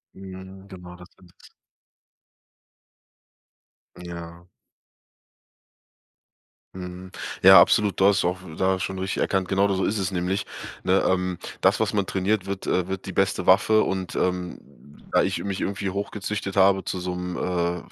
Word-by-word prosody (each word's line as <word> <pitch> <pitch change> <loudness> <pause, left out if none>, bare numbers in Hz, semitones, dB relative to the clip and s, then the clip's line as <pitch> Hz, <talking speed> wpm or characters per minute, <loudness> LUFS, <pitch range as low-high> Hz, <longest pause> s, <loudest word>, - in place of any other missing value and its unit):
Ja, 95 -1 -9 0.2
genau 90 -2 -11
das 90 0 -14
ist 90 -2 -20
es. - - -17 2.5
Ja. 85 -1 -9 2.3
Mhm. 90 0 -8 0.3
Ja, 95 -1 +10
absolut. 105 0 +2
Du 95 - +4
hast 100 -3 +3
auch 90 +1 -1
v 90 -4 -11
da 95 +2 +1
schon 95 0 -4
richtig 95 0 -2
erkannt, 95 -2 0
genau 100 +1 +2
da 100 - 0
so 95 - 0
ist 105 +1 -1
es 95 -1 -2
nämlich, 95 +2 -1 0.4
ne? 95 +1 +2
Ähm, 90 -1 0 0.2
das, - - +3
was - - 0
man 100 -3 0
trainiert, 95 +1 -1
wird 100 -1 -4
äh, 90 -1 0
wird 95 0 -5
die 95 - -6
beste 95 -1 0
Waffe 110 +3 +5
und, 95 -1 -3
ähm, 90 -1 -1 0.5
da - - +4
ich - - -1
mich 100 -1 -3
irgendwie 100 -1 -2
hochgezüchtet 100 0 -4
habe 95 0 +4
zu 90 - -4
so 90 0 -3
'nem, 90 0 -5
äh, 90 -1 -1
95 Hz, 155 wpm, -24 LUFS, 90-95 Hz, 2.5 s, Ja